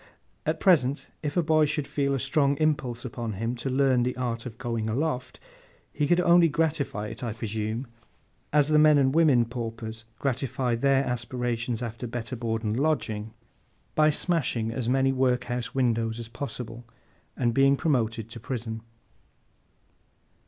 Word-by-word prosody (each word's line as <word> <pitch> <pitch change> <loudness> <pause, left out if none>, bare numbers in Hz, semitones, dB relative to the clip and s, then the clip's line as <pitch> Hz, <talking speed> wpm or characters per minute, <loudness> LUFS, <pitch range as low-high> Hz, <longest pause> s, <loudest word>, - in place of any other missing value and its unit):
At 160 +1 0
present, 145 -7 +3
if 150 +2 -3
a 175 - +4
boy 155 -1 +4
should 150 0 -1
feel 140 0 0
a - - -1
strong 140 +1 +2
impulse 140 -6 0
upon 115 -2 -4
him 115 +5 -2
to 120 +3 -3
learn 130 -1 +3
the 125 +1 -1
art 120 -2 -2
of 115 -2 -9
going 115 -3 -2
aloft, 130 +1 -2 0.5
he 145 0 0
could 175 +3 +4
only 175 -1 +6
gratify 145 -9 -1
it, 115 +4 -8
I 115 -3 -2
presume, 110 +2 -3 0.7
as 150 0 +3
the 155 0 +5
men 155 -1 +6
and 135 -1 +3
women 145 -7 +5
paupers 115 -1 -6
gratify 130 -2 -1
their 135 +3 +2
aspirations 120 -1 -2
after 120 +1 -5
better 120 +2 -4
board 115 -1 -2
and 110 +2 -1
lodging, 110 -8 -1 0.6
by 155 0 +4
smashing 145 -8 0
as 120 0 -2
many 135 +1 +3
workhouse 125 -1 0
windows 115 -3 +1
as 115 -1 -7
possible, 120 -2 -6 0.5
and 120 -1 +1
being 135 +2 +4
promoted 115 -8 0
to 120 - -7
prison. 110 -2 -4
125 Hz, 155 wpm, -27 LUFS, 115-140 Hz, 0.7 s, only